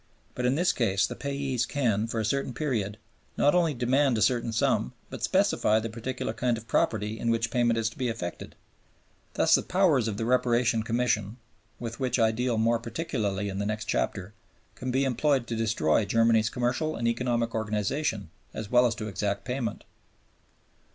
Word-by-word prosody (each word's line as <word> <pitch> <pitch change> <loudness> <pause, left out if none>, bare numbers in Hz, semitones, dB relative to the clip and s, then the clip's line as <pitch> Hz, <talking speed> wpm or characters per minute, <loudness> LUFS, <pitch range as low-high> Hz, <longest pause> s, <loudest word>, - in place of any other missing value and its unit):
But 125 0 -1
in 130 - +2
this 175 +4 +3
case 100 -5 +1
the - - -5
payees 140 -3 -2
can 115 -6 0
(for 115 0 -3
a 110 - -1
certain 130 +1 -1
period) 110 -8 -2 0.4
not 145 - +4
only 170 -4 +2
demand 130 +1 +2
a - - -1
certain 120 -2 +1
sum 110 - +1 0.2
but - - -7
specify 110 - +2
the 115 0 -5
particular 120 0 -4
kind 120 0 0
of 115 0 -11
property 110 0 0
in 115 - -1
which 115 0 0
payment 120 -2 +2
is 115 -1 +1
to - - -16
be 130 - 0
effected. 90 -6 -6 0.8
Thus - - +3
the - - +6
powers 165 - +2
of 105 -2 -3
the 115 - -2
Reparation 120 -2 +2
Commission, 110 -1 -1 0.4
with 115 -1 -6
which 130 -2 0
I 110 -2 +4
deal 120 +1 -1
more 115 +1 +2
particularly 110 - -2
in 100 0 -4
the 100 - -1
next 110 0 -3
chapter, 90 - -2 0.4
can 130 - -5
be 135 +2 +1
employed 135 0 +1
to 120 - -4
destroy 110 0 +1
Germany's 115 +1 +3
commercial 125 +7 -1
and 115 - -1
economic 120 -1 0
organization 105 - -2 0.2
as 105 -2 -6
well 125 0 +5
as 115 - -2
to 110 0 -5
exact 100 +1 -2
payment. 125 -3 -3
115 Hz, 185 wpm, -27 LUFS, 110-125 Hz, 0.8 s, the